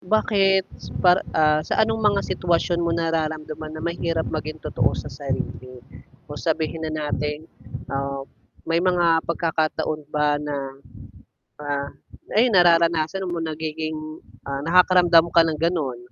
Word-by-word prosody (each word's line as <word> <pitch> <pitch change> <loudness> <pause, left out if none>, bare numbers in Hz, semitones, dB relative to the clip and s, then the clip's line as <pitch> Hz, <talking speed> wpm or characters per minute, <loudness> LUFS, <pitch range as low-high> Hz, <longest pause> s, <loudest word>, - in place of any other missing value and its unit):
bakit 195 -1 +2 0.4
par 180 +1 +6 0.2
ah, 155 -1 +4
sa - - -1
anong 225 0 -2
mga 205 -2 +3
sitwasyon 175 0 0
mo 170 - 0
nararamdaman 155 -2 -3
na 155 - -7
mahirap 170 -1 -1
maging 155 0 -4
totoo - - 0
sa - - -6
sarili 125 0 -5 0.5
o - - -7
sabihin 160 0 -1
na 155 - -5
natin, 150 +1 -3 0.5
ah, 140 0 -3 0.4
may 165 +1 +1
mga 175 -2 +3
pagkakataon 160 -2 -1
ba 150 -1 +1
na, 150 -1 -4 1.0
ah, 140 -1 -3 0.4
ay, 235 +4 +4
nararanasan 170 0 +3
mo 175 -1 -3
nagiging, 155 0 -5 0.3
ah, 140 0 -3
nakakaramdam 175 -1 +5
ka 170 - +7
ng 160 -2 -2
gano'n? 160 -8 -1
160 Hz, 130 wpm, -23 LUFS, 155-175 Hz, 1.0 s, ka